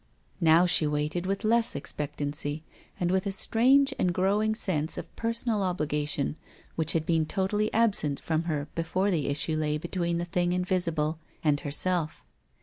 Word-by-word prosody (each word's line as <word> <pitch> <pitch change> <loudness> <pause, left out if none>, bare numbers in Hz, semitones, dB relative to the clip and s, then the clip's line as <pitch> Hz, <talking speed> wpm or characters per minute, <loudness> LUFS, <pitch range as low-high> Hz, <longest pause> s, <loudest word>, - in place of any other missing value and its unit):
Now 165 0 +5
she 175 -3 +4
waited, 150 +4 -2
but - - -3
with 195 +2 -2
less 230 +1 +2
expectancy, 145 +1 -4 0.4
and 175 -1 0
with 190 +1 +1
a - - -1
strange 265 +8 +3
and 180 - +2
growing 205 +5 +1
sense 160 -8 0
of - - -8
personal 230 -1 -1
obhgation 150 -5 -1 0.4
which 160 -1 0
had 160 -1 0
been 160 -2 +1
totally 205 +3 0
absent 205 -11 +1
from 160 0 -1
her 150 -3 -2
before 185 +4 0
the 160 -6 0
issue 145 +3 -1
lay 150 -1 0
be 160 - -6
tween 170 -2 -1
the 170 - -2
thing 175 0 0
invisible 170 -4 0 0.2
and 150 -2 +2
herself. 155 +2 0
170 Hz, 165 wpm, -28 LUFS, 155-195 Hz, 0.4 s, Now